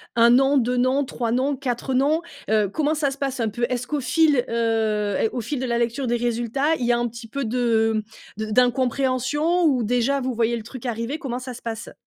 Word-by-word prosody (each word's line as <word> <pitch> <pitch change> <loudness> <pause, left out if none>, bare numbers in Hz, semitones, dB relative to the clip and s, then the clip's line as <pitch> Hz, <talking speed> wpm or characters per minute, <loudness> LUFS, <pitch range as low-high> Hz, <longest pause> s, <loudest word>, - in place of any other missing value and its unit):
1 235 0 +6
nom, 270 +3 +4
2 250 0 +1
noms, 255 +3 +2
3 235 -2 -3
noms, 265 +4 +1
4 260 0 -3
noms, 290 +5 +2 0.3
heu, 215 -1 +3
comment 300 +8 0
ça 290 -2 0
se 275 - -7
passe 275 -2 -3
un 225 -2 0
peu? 235 +3 -1
Est-ce 250 -1 -2
qu'au 300 +2 -1
fil, 280 0 +3
heu 220 -3 0
et 225 - +2
au 245 - -4
fil 265 +5 -3
de 260 - -2
la 235 -1 0
lecture 235 +3 -1
des 240 - +1
résultats, 240 +6 0
il 245 - -1
y 240 - +3
a 240 - +3
un 240 0 0
petit 235 0 -9
peu 275 +4 -3
de, 225 -2 +1 0.3
mmh, 215 - -3
de 215 - -7
d'incompréhension 260 +7 +1
ou 265 -6 +2
déjà 245 +5 +1
vous 255 0 -2
voyez 235 0 +1
le 225 - -7
truc 255 +2 -10
arriver, 235 +4 -3
comment 255 -6 -4
ça 255 0 -7
se 245 - -11
passe? 230 0 -6
245 Hz, 240 wpm, -23 LUFS, 230-270 Hz, 0.3 s, 1